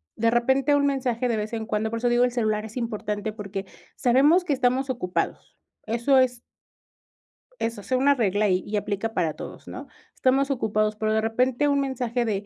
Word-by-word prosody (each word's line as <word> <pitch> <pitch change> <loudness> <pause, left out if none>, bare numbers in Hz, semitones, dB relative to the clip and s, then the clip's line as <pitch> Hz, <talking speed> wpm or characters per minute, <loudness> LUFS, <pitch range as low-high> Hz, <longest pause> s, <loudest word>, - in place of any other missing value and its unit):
de 230 +1 +2
repente 265 +4 +2
un 285 0 +2
mensaje 255 -3 0
de 230 -2 0
vez 210 +2 -4
en 225 -1 -3
cuando 215 0 -1
por 230 - -3
eso 245 - +1
digo, 240 0 +3
el 250 - +2
celular 215 -3 -1
es 220 +3 -9
importante, 215 -3 -3
porque, 200 -2 -6 0.3
sabemos 280 +9 +4
que 315 - 0
estamos 260 0 +1
ocupados. 180 -9 -3 0.3
Eso 235 +5 +2
es 250 -2 +2 1.2
eso, 225 -2 -3
sea 255 - 0
una 280 +2 +4
regla 210 -3 +1
y 185 0 +1
y 210 - -2
aplica 205 +2 -2
para 165 -7 0
todos, - - -10
¿no? - - -8 0.3
Estamos 270 +2 +2
ocupados, 215 -4 0
pero, 215 +1 -1
de 220 - +2
repente 250 +5 +1
un 280 -1 +2
mensaje 250 -3 -1
de: 205 -2 -2
235 Hz, 195 wpm, -25 LUFS, 215-260 Hz, 1.2 s, sabemos